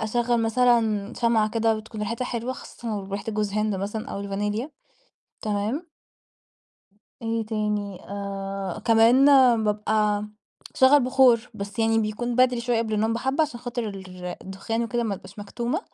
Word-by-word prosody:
أشغل 235 +2 +1
مثلًا 225 -2 +2
شمعة 230 -3 +2
كده 225 0 +2
بتكون 215 0 -9
ريحتها 230 +4 -2
حلوة، 245 +1 -3
خاصةً 240 -1 -9
لو 210 -3 -3
ريحة 200 - -3
جوز 210 -1 -1
هند 215 0 0
مثلًا 205 +4 -4
أو 200 - -4
الفانيليا، 205 +6 -3 0.7
تمام؟ 215 - -2 1.3
إيه 225 -1 -2
تاني، 210 -3 -2
آآ، 195 -1 -5
كمان 230 +4 +5 0.4
بابقى 210 0 +1 0.5
أشغّل 270 +2 +6
بخور، 250 -2 +4
بس 200 +1 -7
يعني 225 0 +3
بيكون 225 +3 -2
بدري 255 -1 +4
شوية 235 -1 0
قبل 220 -1 -1
النوم 220 +2 +1
بحبّة، 265 +6 0
عشان 250 -6 -3
خاطر 240 -2 -3 0.5
الدخان 195 +5 -3
وكده، 240 +1 -1
ما 220 -3 -1
أبقاش 190 +2 -13
مكتومة. 240 - -3
225 Hz, 145 wpm, -25 LUFS, 210-240 Hz, 1.3 s, أشغّل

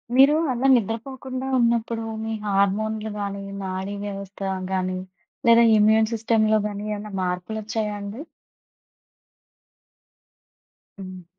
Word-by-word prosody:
మీరు 270 +3 +7 0.2
అలా 250 +2 +1
నిద్రపోకుండా 255 +4 -3
ఉన్నప్పుడు 235 -1 +1 0.2
మీ 225 0 -3
హార్మోన్‌లు 210 +2 0
గాని 200 -1 -3 0.2
నాడీ 190 +1 -4
వ్యవస్థ 200 -1 -7 0.3
గాని 185 0 -1 0.5
లేదా 235 0 +7
ఇమ్యూన్ 220 +1 +4
సిస్టమ్‌లో 220 -1 +2
గాని 205 0 -6
ఏమ‌న్నా 210 +1 -7
మార్పులొచ్చాయాండి? 205 +4 -3 2.8
హ్మ్. 185 -2 -9
215 Hz, 90 wpm, -24 LUFS, 200-230 Hz, 2.8 s, మీరు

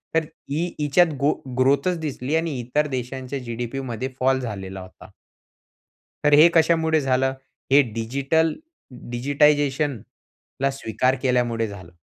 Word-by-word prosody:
तर 165 - +2 0.3
ई 170 +3 0
हिच्यात 155 +3 +3
गो 145 +2 +3 0.3
ग्रोथच 140 +7 +2
दिसली 145 -2 -3
आणि 165 0 0
इतर 145 +5 0
देशांच्या 130 +1 -4
जी-डी-पी 120 +1 -5
मध्ये 130 -1 -4
फॉल 130 +1 +2
झालेला 95 -5 -6
होता. 95 0 -14 1.2
तर 150 - +4
हे 150 +3 +8
कशामुळे 160 -1 +3
झालं. 130 0 +1 0.4
हे 140 +1 +7
डिजिटल 140 +8 0 0.6
डिजिटायझेशनला 140 0 0
स्वीकार 130 0 0
केल्यामुळे 120 -3 +1
झालं. 95 -4 -11
135 Hz, 120 wpm, -23 LUFS, 120-150 Hz, 1.2 s, हे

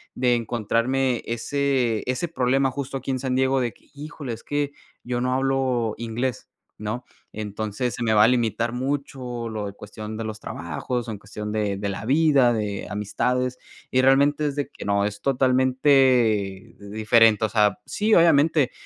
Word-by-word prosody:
de 125 -1 +2
encontrarme 120 +3 0
ese 125 -1 0
ese 130 +7 -1
problema 135 -3 +1
justo 135 0 -4
aquí 135 +1 -4
en 130 - -1
San 130 0 -1
Diego 130 0 +2
de 120 -2 -1
que - - -26
híjole, 145 -3 -7
es 115 - -10
que 145 -1 -2 0.3
yo 120 0 -2
no 125 0 0
hablo 130 -4 0
inglés, 120 +2 -3 0.3
¿no? 110 +4 -4 0.3
Entonces, 110 +3 -3
se 120 - -4
me 110 -1 +2
va 105 -1 +6
a - - +5
limitar 115 -1 +1
mucho 130 -2 -3
lo 110 -2 -4
de 100 - -7
cuestión 105 +1 -8
de 115 - -4
los 110 -1 -6
trabajos, 110 - -4
en 110 - -4
cuestión 105 +1 -7
de 105 -2 -1
de 100 0 -3
la 100 +2 -5
vida, 140 -2 +4
de 105 -3 -3
amistades, 125 +5 -1 0.3
y 130 - +3
realmente 140 +3 +3
es 140 - -3
de 145 -1 -2
que - - -10
no, 100 0 +2
es 105 0 -4
totalmente 130 -6 +2
diferente. 110 +2 +3
O - - -2
sea, 105 -3 +2
sí, 215 +1 0
obviamente 155 -4 +4
125 Hz, 170 wpm, -24 LUFS, 110-135 Hz, 0.3 s, va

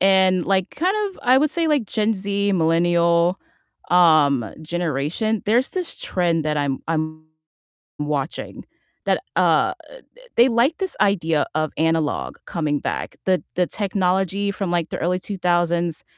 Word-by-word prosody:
and, 190 -2 +4
like, 190 -2 +1
kind 370 +6 0
of, 385 - -15
I 255 0 +5
would 300 +1 +2
say 335 +1 +1
like 290 -7 +2
Gen 215 +2 0
Z, 200 +1 -1
millennial, 170 +1 +2 0.5
um, 155 -8 +4
generation, 175 - -2
there's 240 +5 +3
this 365 -2 -3
trend 170 -3 0
that 150 -1 -1
I'm 140 -2 -1
I'm 155 -1 -2 0.8
watching 145 0 -4 0.4
that, - - +1
uh, - - +2
uh, - - +3 0.4
th - - -19
they 240 +3 +6
like 245 +7 +2
this 380 -2 -2
idea 165 -7 +2
of 155 -1 -1
analog 160 -1 -1
coming 150 -4 -1
back. - - -4
The 185 -1 +2
the 180 - +2
technology 195 0 0
from, 195 -3 -3
like, 170 -2 -1
the - - -4
early 180 +2 0
2000s, 175 -3 0
180 Hz, 150 wpm, -21 LUFS, 160-205 Hz, 0.8 s, they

